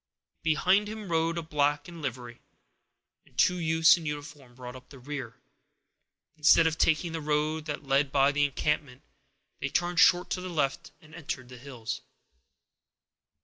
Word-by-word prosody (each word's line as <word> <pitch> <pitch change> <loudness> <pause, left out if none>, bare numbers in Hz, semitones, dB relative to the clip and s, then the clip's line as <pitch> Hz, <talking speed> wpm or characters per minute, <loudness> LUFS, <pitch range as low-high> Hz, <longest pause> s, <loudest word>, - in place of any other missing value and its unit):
Behind 185 +6 +2
him 215 -3 -7
rode 165 +1 +1
a 170 - -3
black 145 -1 0
in 170 -2 -10
livery, 120 -3 -6 0.8
and - - -27
two 180 -1 +3
youths 160 0 +5
in 165 -2 -7
uniform 145 -4 -7
brought 125 0 -9
up 130 0 -13
the 140 - -13
rear. 130 -3 -7 1.0
Instead 155 +1 +5
of 160 -1 +1
taking 160 +1 +1
the 165 -1 -4
road 150 +1 -1
that 150 -1 -5
led 135 +1 +2
by 140 0 +4
the 145 0 +1
encampment, 145 -1 -2 0.6
they 140 - -3
turned 175 +3 0
short 180 0 +5
to 180 - -2
the 185 - -6
left 145 -5 -1
and 155 0 -18
entered 130 -6 -6
the 125 - -11
hills. 125 -2 -6
150 Hz, 160 wpm, -28 LUFS, 135-165 Hz, 1.0 s, youths